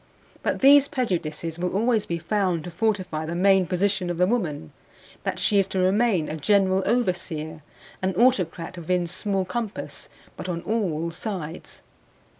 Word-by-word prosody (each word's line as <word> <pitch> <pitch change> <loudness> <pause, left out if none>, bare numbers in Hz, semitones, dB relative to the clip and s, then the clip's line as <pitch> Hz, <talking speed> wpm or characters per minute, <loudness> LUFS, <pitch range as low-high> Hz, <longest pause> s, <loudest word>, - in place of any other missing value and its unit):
But - - -1
these 280 +1 +7
prejudices 170 - -2
will 180 +1 -2
always 225 0 +1
be 170 - -1
found 180 -1 0
to 175 - -7
fortify 185 -5 -1
the 170 - -3
main 190 0 +4
position 190 0 0
of 175 - -2
the 180 - +4
woman, 175 - -2 0.5
that - - -3
she 205 - +3
is 195 - +2
to 190 -1 -2
remain 190 -2 +2
a 155 - -4
general 190 +3 +3
overseer, 175 -9 -1 0.4
an 190 0 -1
autocrat 185 -7 +1
within 175 +1 0
small 190 +2 -1
compass 220 +3 -5 0.3
but - - -6
on 170 -1 -2
all 170 -7 -1
sides. 170 -3 -6
185 Hz, 155 wpm, -25 LUFS, 170-205 Hz, 0.5 s, these